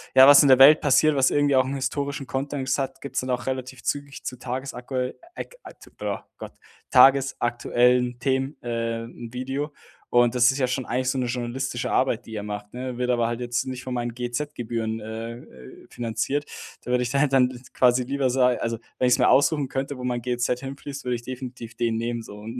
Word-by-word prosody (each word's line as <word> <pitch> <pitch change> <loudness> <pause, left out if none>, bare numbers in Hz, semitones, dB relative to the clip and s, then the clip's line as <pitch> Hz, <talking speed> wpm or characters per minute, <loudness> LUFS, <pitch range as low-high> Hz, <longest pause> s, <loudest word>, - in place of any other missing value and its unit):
ja, 130 0 +9
was 145 +1 +9
in - - +4
der 130 - +8
Welt 145 +4 +8
passiert, 150 +1 +4
was 135 -1 +4
irgendwie 145 -1 +2
auch 130 - +4
'n 135 +2 -3
historischen 140 +1 -3
Kontext 135 -1 -2
hat, 135 0 -3
gibt's 140 - -3
dann 130 - -6
auch 125 - -2
relativ 130 -1 -4
zügig 145 -1 -4
zu 125 - -4
tagesakuell 130 0 -4 0.2
ek - - -8
atu - - -14
äh, - - -1 0.2
Gott, - - -8 0.4
tagesaktuellen 125 -2 +3
Themen, 135 +2 -1
äh, 115 -1 -2
'n 115 0 -10
Video. 135 +4 -3 0.4
Und 120 0 +4
das 120 +1 +5
ist 135 - -4
ja 130 - +2
schon 125 0 -2
eigentlich 130 +1 -1
so 130 - -1
'ne 125 - 0
journalistische 125 +1 -3
Arbeit, 125 -2 +1
die 110 - -8
er 105 - -4
macht, 105 0 -7
ne? 125 0 -5
Wird 125 0 -1
aber 120 -1 +1
halt 120 0 -3
jetzt 120 0 -1
nicht 130 -1 -5
von 130 - -4
meinen 120 -1 -3
GEZ-Gebühren, 120 -3 -3
äh, 110 +2 -6
äh, 65 - -15
finanziert. 120 +5 -2 0.4
Da 125 - -5
würde 125 - +2
ich 120 - -3
da 140 - +1
halt 140 -1 +2
dann 125 -1 +2
quasi 125 0 +3
lieber 135 0 0
sa 125 0 +3
also, 115 -2 -2 0.2
wenn 125 - +3
ich's 125 - +3
mir 125 - +4
aussuchen 145 0 +3
könnte, 135 +1 -3
wo 125 - -8
mein 125 -1 -2
GEZ 120 0 -1
hinfließt, 140 0 -7
würde 125 - 0
ich 120 - -6
definitiv 125 -2 -8
den 115 -2 0
nehmen 115 0 -3
so. 105 - -11
Und 115 +4 -7
125 Hz, 210 wpm, -24 LUFS, 120-135 Hz, 0.4 s, ja